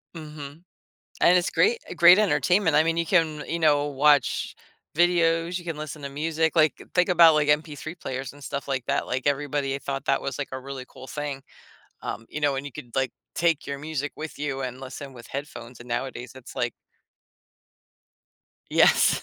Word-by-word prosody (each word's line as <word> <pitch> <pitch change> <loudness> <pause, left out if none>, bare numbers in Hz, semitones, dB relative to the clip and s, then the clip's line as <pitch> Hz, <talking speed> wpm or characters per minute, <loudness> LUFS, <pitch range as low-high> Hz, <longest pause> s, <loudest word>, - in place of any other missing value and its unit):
Mhm. 150 -1 -9 0.6
And 180 +1 +6
it's 175 - -1
great 460 +2 +3 0.2
great 175 +3 +8
entertainment, 185 -4 +2
I 150 - +6
mean, 165 0 0
you 170 - 0
can 160 -4 +1
you 170 - -2
know, 145 -2 +3
watch 145 -1 +2 0.4
videos, 170 0 +2
you 175 - -11
can 165 -3 -4
listen 150 -1 -7
to 140 - -4
music, 160 +3 -1
like, 155 -1 +3
think 180 +1 +3
about 170 -3 +7
like 150 -1 +2
MP3 150 +1 -1
players 130 -1 -5
and 145 - -16
stuff 140 0 -5
like 130 -3 -1
that, - - 0
like, 130 +1 -3
everybody 140 -1 0
thought 140 0 -4
that 135 - +2
was, 140 - -4
like, 145 - -3
a 130 - -3
really 135 -1 -7
cool 130 - -12
thing, 145 -1 -5 0.6
um, 115 +2 -5
you 150 - -6
know, 145 -2 +2
and 135 - -4
you 145 - -8
could, 125 -5 -10
like, 135 -1 +1 0.2
take 165 -3 +1
your 140 0 -4
music 145 -1 -4
with 155 -1 -7
you 140 -2 -3
and 130 0 -5
listen 135 +1 -8
with 120 -2 -12
headphones, 125 -4 -7
and 120 - -11
nowadays, 120 +1 -4
it's, 130 -2 -12
like - - 0 2.0
Yes. - - +4
145 Hz, 185 wpm, -25 LUFS, 135-165 Hz, 2.0 s, great